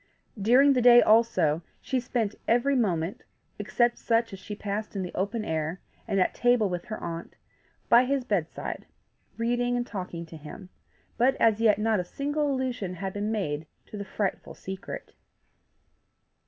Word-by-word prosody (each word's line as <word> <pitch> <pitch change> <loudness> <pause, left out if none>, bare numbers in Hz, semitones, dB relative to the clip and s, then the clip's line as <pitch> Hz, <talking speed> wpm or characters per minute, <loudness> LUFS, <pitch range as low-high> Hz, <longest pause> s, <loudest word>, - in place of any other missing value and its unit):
During 260 +7 +6
the 255 - +2
day 240 0 +8
also 215 -10 +3 0.2
she 260 - -1
spent 235 -4 -1
every 245 +4 +3
moment, 180 -7 0 0.4
except 240 0 +1
such 230 -2 +1
as 195 - -7
she 210 - -7
passed 210 +1 -4
in 195 - -1
the 180 - -6
open 210 +4 -2
air, 160 +2 -2 0.3
and 195 - +1
at 185 - +2
table 245 -3 +3
with 180 -2 -4
her 220 -2 -5
aunt, 170 0 -6 0.5
by 240 +2 +6
his 275 0 0
bedside, 200 -9 -3 0.5
reading 245 +1 0
and 240 - -1
talking 180 -6 -6
to 160 0 -11
him; 160 +5 -10 0.5
but 260 +3 +4
as 225 -3 +3
yet 215 -3 +5
not 215 -1 +1
a - - -1
single 290 +9 -1
allusion 250 -8 -2
had 190 +1 -4
been 205 +1 -2
made 160 -8 -2 0.2
to - - -11
the 200 - -4
frightful 200 0 -3
secret. 190 0 -7
215 Hz, 165 wpm, -27 LUFS, 185-240 Hz, 0.5 s, day